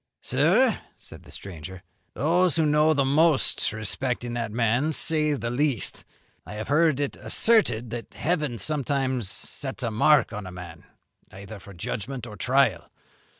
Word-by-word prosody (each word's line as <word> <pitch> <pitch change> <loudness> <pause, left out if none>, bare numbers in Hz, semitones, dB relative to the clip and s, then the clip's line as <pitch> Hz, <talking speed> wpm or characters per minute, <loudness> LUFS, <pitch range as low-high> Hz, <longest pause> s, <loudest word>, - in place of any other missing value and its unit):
"Sir," 185 - +3 0.2
said - - -12
the - - -16
stranger, 90 0 -9 0.3
"those 170 +5 +2
who 160 -2 +2
know 150 +1 +4
the 140 -1 +2
most 150 +1 +2
respecting 120 +3 -3
that 115 -2 -3
man 120 +7 +1
say 150 -1 +2
the 120 -4 -3
least. 135 -3 -1 0.4
I - - -10
have 110 +3 -6
heard 155 -1 +3
it 145 -1 -2
asserted 125 - +2
that 120 0 -7
heaven 150 -7 -1
sometimes 135 -3 -1
sets 135 +4 -5
a 115 - -1
mark 135 +4 +3
on 105 -2 -6
a - - -8
man, 90 -2 -10 0.5
either 100 +2 -10
for 100 +1 -13
judgment 120 +8 -5
or 105 -3 -9
trial. 135 +4 +1
130 Hz, 150 wpm, -25 LUFS, 110-150 Hz, 0.5 s, know